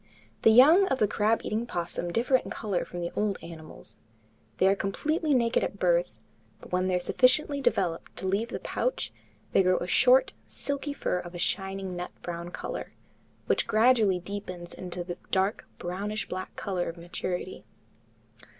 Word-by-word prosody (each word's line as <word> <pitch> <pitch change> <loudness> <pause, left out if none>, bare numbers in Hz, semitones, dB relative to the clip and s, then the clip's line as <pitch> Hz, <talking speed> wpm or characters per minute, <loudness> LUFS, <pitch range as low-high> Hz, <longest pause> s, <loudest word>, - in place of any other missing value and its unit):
The - - +6
young 305 - +7
of 265 - +1
the 210 - +3
crab 215 +3 +1
eating 215 +1 -1
opossum 175 -5 -3
differ 240 +7 +2
in - - -8
color 200 -5 -2
from 175 - -6
the 170 - -3
old 205 -2 0
animals. 160 -2 -10 0.6
They - - +3
are 195 - +4
completely 295 - 0
naked 235 -2 +2
at - - -3
birth, 175 - +2 0.4
but - - -14
when 185 +1 +1
they 185 - +1
are - - +2
sufficiently 280 - +2
developed 175 -9 0
to 190 - -3
leave 200 +5 +1
the - - -5
pouch, - - -2 0.4
they - - +5
grow 185 -1 +3
a - - -2
short, 250 +8 +5
silky 285 0 -4
fur 180 -9 -1
of 175 0 -8
a - - -4
shining 190 +1 -2
nut 175 0 -4
brown 170 0 -5
color, - - -6 0.5
which - - +1
gradually 220 -4 +4
deepens 180 -2 -7
into 180 -1 -6
the 175 0 -6
dark 190 +3 0
brownish 195 +3 -3
black 185 0 -6
color 185 -4 -2
of 165 - -8
maturity. 175 +1 -4
190 Hz, 170 wpm, -28 LUFS, 175-230 Hz, 0.6 s, young